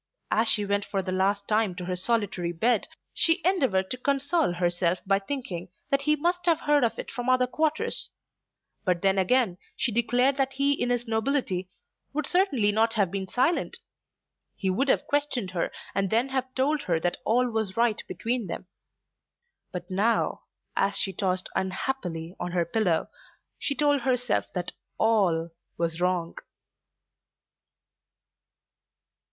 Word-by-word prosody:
As 225 +2 +3
she 210 -2 +3
went 200 0 0
for 195 -2 -2
the 185 - -3
last 195 +2 +1
time 215 -4 +1
to 180 -1 -6
her 180 0 -2
solitary 190 -3 0
bed 220 +6 +1 0.3
she 330 -1 +3
endeavoured 260 - +2
to 255 - -1
console 280 - +1
herself 175 0 +1
by 195 0 +3
thinking 195 -6 -5 0.2
that 275 0 +3
he 300 +2 +3
must 350 +3 -1
have 330 -1 +3
heard 295 -2 +3
of 230 - +1
it - - -6
from 245 +2 -3
other 255 0 +4
quarters. 315 - 0 0.7
But 180 -3 0
then 195 0 +3
again 190 -2 +2 0.2
she 240 - 0
declared 245 +4 +2
that 270 -1 0
he 280 +1 +2
in 245 -3 -1
his 245 -1 0
nobility 220 -5 0 0.4
would 305 +1 -1
certainly 290 - +2
not 225 +2 +2
have 200 -5 +2
been 190 -1 -3
silent. 260 - +1 0.8
He 190 -2 -1
would 265 +9 +1
have - - +2
questioned 285 -9 -1
her 175 -2 -1 0.2
and 195 -1 0
then 235 +6 +2
have 260 -1 -2
told 285 +3 +1
her 170 - 0
that 175 +1 -1
all 245 +2 +2
was 220 -3 -2
right 235 -2 +2
between 225 +4 -2
them. 170 - -5 1.1
But 180 0 -6
now 215 +5 +1 0.3
as 200 - +1
she 195 - 0
tossed 185 -1 -1
unhappily 185 -3 -2
on 175 - -4
her 175 -2 +2
pillow 175 -3 +1 0.5
she 280 - -1
told 290 -2 +3
herself 250 -3 0
that 180 -1 -2 0.3
all 185 -7 +2 0.3
was 165 0 -1
wrong. 180 -2 0
220 Hz, 155 wpm, -27 LUFS, 185-265 Hz, 1.1 s, other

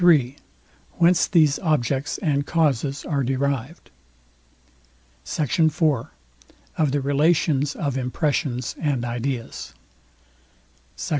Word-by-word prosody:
III 145 -7 +4 0.6
WHENCE 175 +1 +4
THESE 155 -5 +3
OBJECTS 145 -3 0
AND 145 -3 0
CAUSES 145 -4 0
ARE 140 -5 0
DERIVED 135 +3 -2 1.3
SECT. 150 +1 -2
IV 160 +1 +2 0.9
OF 155 -4 +1
THE 145 0 0
RELATIONS 145 0 +2
OF 140 -4 -2
IMPRESSIONS 130 -1 -1
AND 140 -6 -1
IDEAS 120 0 -4 1.2
SECT. - - -6
140 Hz, 95 wpm, -23 LUFS, 130-155 Hz, 1.3 s, III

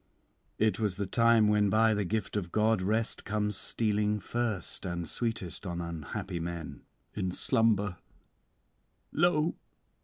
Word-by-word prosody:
'It 110 +1 +2
was 105 -4 0
the 100 +1 -2
time 115 +1 +4
when 105 -1 +3
by 110 +2 +4
the 105 -1 0
gift 100 +2 -2
of 90 -5 -2
God 110 -1 +2
rest 110 +4 0
comes 105 -1 -1
stealing 105 0 0
first 110 -2 -2
and 85 -3 -3
sweetest 115 -9 -3
on 85 -1 -3
unhappy 85 0 -4
men. 85 -1 -5 0.3
In 95 - -2
slumber, 105 -2 +2 1.1
lo! 165 -1 +2
105 Hz, 130 wpm, -30 LUFS, 90-110 Hz, 1.1 s, time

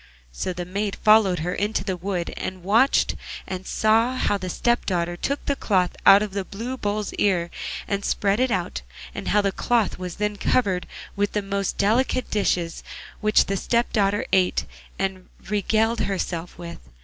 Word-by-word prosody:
So - - -3
the 175 0 -5
maid 200 +3 -2
followed 210 -4 +5
her 175 +3 -2
into 205 0 -1
the 190 -2 -2
wood 180 -1 -3
and 185 -1 -5
watched, 225 +8 +3 0.3
and 190 0 -5
saw 225 +4 +2
how 205 - +1
the 185 - -4
step 240 +6 0
daughter 175 -2 0
took 280 +10 -3
the 280 - +1
cloth 185 -8 +1
out 200 +1 +9
of 210 - -4
the 200 -1 -1
Blue 230 +7 -5
Bull's 210 -3 -2
ear, 175 -4 +2 0.4
and 200 0 -1
spread 200 +2 +1
it 255 0 +2
out, 180 - -2 0.3
and - - -6
how 210 - +3
the 200 -1 +1
cloth 230 0 0
was 180 -2 -5
then 210 0 -2
covered 195 -6 +1 0.3
with 205 0 0
the 210 - 0
most 195 -1 -2
delicate 245 +5 +1
dishes, 175 -5 0 0.4
which 215 0 +4
the 195 - -1
step 235 +4 0
daughter 205 +3 +2
ate 185 -1 +3 0.3
and 190 -1 -3 0.2
regaled 220 +3 +1
herself 180 -3 -3
with. 170 -1 -8
200 Hz, 175 wpm, -24 LUFS, 185-215 Hz, 0.4 s, out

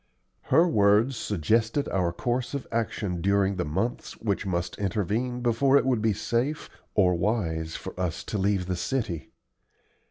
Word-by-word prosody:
Her 165 +7 +4
words 105 0 +4
suggested 110 - 0
our 90 -3 +1
course 120 +9 -2
of 140 - -4
action 105 -6 -2
during 100 0 +2
the 90 - 0
months 115 +11 -2
which 100 -3 -2
must 90 -1 -2
intervene 110 +5 -1
before 130 +4 +3
it - - +2
would 125 -4 +1
be 110 0 +3
safe 120 +8 -2 0.2
or 90 -3 +4
wise 85 -4 -1
for - - -6
us 90 -3 -2
to 105 - -3
leave 95 -1 +1
the 90 0 -2
city. 90 - -2
105 Hz, 155 wpm, -27 LUFS, 90-120 Hz, 0.2 s, Her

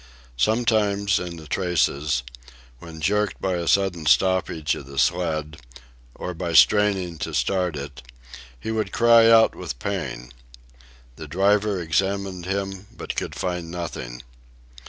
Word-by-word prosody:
Sometimes, 105 - +2
in 85 -1 -6
the 80 - -11
traces, 75 -7 0 0.6
when 80 +1 -11
jerked 105 +5 0
by 95 - -1
a 85 -1 -3
sudden 90 -5 +1
stoppage 90 -5 +2
of 70 - -8
the 70 0 -11
sled, 80 +2 0 0.6
or 90 - -5
by 85 0 -4
straining 95 -3 +4
to 80 -1 -4
start 90 +6 0
it, 70 -1 -7 0.6
he 110 - -4
would 110 -3 -2
cry 115 0 +6
out 115 -1 +6
with - - -6
pain. 75 -7 -4 0.9
The - - -8
driver 100 +2 +2
examined 95 +2 -1
him, 95 0 -3
but - - -5
could - - -4
find 90 -2 -3
nothing. 80 -8 -6
90 Hz, 135 wpm, -23 LUFS, 80-100 Hz, 0.9 s, cry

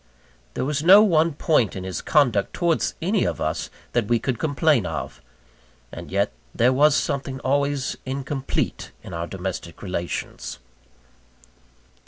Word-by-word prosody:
There 130 - -1
was 150 +1 -1
no 190 +6 +8
one 165 -5 +3
point 140 -7 +1
in 95 - -5
his 95 -2 -4
conduct 125 -10 +2
towards 170 -2 +1
any 195 +4 +2
of - - -1
us - - -2 0.2
that 120 -3 0
we 120 - +3
could 125 +1 -2
complain 145 -4 +2
of; 80 -3 -5 0.7
and - - -8
yet - - +1 0.2
there 125 +2 +4
was 145 +2 +5
something 135 -2 -2
always 140 -1 0
incomplete 135 +1 -3
in - - -9
our 85 0 -3
domestic 90 -2 -6
relations. 90 -8 -4
135 Hz, 140 wpm, -23 LUFS, 105-150 Hz, 0.7 s, no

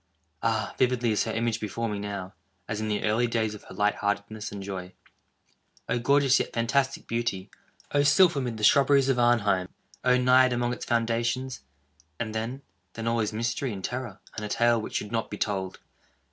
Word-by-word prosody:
Ah, 110 -2 0
vividly 125 -2 +2
is 105 - +1
her 110 - -2
image 115 0 -1
before 115 +2 -3
me 105 -2 -3
now, 100 -1 -5 0.3
as 105 0 -3
in 110 - -2
the 105 -1 -1
early 110 +3 +2
days 110 -2 0
of 105 - -10
her - - -11
light 105 0 +2
heartedness 105 +1 -2
and 100 -1 -6
joy! 95 -2 -6 0.9
Oh, 115 +1 0
gorgeous 140 +1 +4
yet - - -3
fantastic 135 +4 0
beauty! 115 -5 -2 0.4
Oh, 145 - +3
sylph 160 +5 +5
amid 125 -5 -2
the 105 - -6
shrubberies 140 +3 +5
of 130 -2 +2
Arnheim! 105 -6 +2 0.3
Oh, 125 0 +4
Naiad 125 0 +5
among 120 0 0
its - - -6
fountains! 120 +2 0 0.6
And 110 -2 -3
then—then 110 -3 -6
all 115 0 +1
is 105 -2 0
mystery 115 +4 -2
and 95 -3 -7
terror, 120 -4 -4 0.2
and 105 - -5
a 105 - -4
tale 120 0 +3
which - - -7
should 105 - -2
not 115 -1 -1
be 105 - -6
told. 95 -3 -2
115 Hz, 190 wpm, -27 LUFS, 105-125 Hz, 0.9 s, sylph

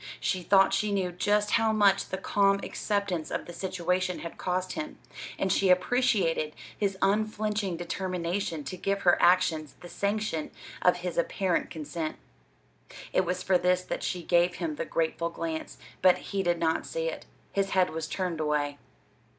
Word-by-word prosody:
She 185 - 0
thought 195 +2 +4
she 210 +1 +1
knew 190 -3 0
just 205 +3 +1
how 225 -1 +3
much 200 -2 +3
the 190 - -2
calm 200 +1 +2
acceptance 200 -6 -2
of - - -3
the 175 - -9
situation 180 0 -1
had 170 - -7
cost 185 0 -2
him, 305 -1 -5 0.4
and 190 -1 +1
she 195 -1 +2
appreciated 180 -6 +2 0.2
his 195 -2 -1
unflinching 210 -2 0
determination 175 -2 -2
to 185 +7 -6
give 200 +2 -1
her 175 - +4
actions 175 -4 +3
the 175 - -10
sanction 200 -6 -1 0.3
of 180 0 +4
his 175 -2 -1
apparent 180 +1 0
consent. 155 0 -4 1.0
It - - +3
was 180 +1 -2
for 185 -1 +3
this 180 +1 +2
that - - -4
she 180 -2 -3
gave 175 +1 +3
him 165 -3 -2
the 150 - -4
grateful 165 +1 -1
glance 165 -1 -5 0.2
but 185 -1 +6
he 200 -1 -3
did 175 -2 +1
not 165 -1 0
see - - -2
it. - - -5 0.2
His 195 -1 0
head 185 -2 +2
was 160 0 -4
turned 180 -2 -2
away. 145 -2 0
185 Hz, 165 wpm, -28 LUFS, 170-200 Hz, 1.0 s, but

